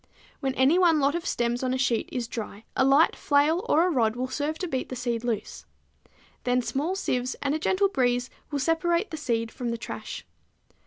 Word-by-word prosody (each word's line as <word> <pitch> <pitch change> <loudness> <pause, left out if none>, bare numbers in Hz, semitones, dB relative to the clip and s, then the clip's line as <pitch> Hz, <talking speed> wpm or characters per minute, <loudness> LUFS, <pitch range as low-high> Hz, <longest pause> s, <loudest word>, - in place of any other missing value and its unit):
When 270 -2 -2
any 275 +7 +4
one 335 -4 +5
lot 280 0 +2
of 340 0 -3
stems 240 0 0
on 255 0 0
a - - -1
sheet 250 -4 0
is 245 -3 -3
dry 220 -2 -6
a - - +3
light 275 +4 +5
flail 300 +5 +2
or 330 +3 +5
a 365 - +1
rod 230 -6 +2
will 255 +1 -3
serve 295 +4 -2
to 365 - -3
beat 260 -5 -3
the 255 - -4
seed 240 -2 -2
loose. 230 -4 -3 0.8
Then 250 0 +1
small 275 +10 -1
sieves 255 -9 -1
and 280 0 +1
a 310 - -1
gentle 380 +5 +2
breeze 245 -7 0 0.2
will 290 - -2
separate 340 +6 +1
the 315 - -4
seed 230 -6 -1
from 245 -2 -4
the 235 - -2
trash. 225 - -7
265 Hz, 210 wpm, -26 LUFS, 245-315 Hz, 0.8 s, one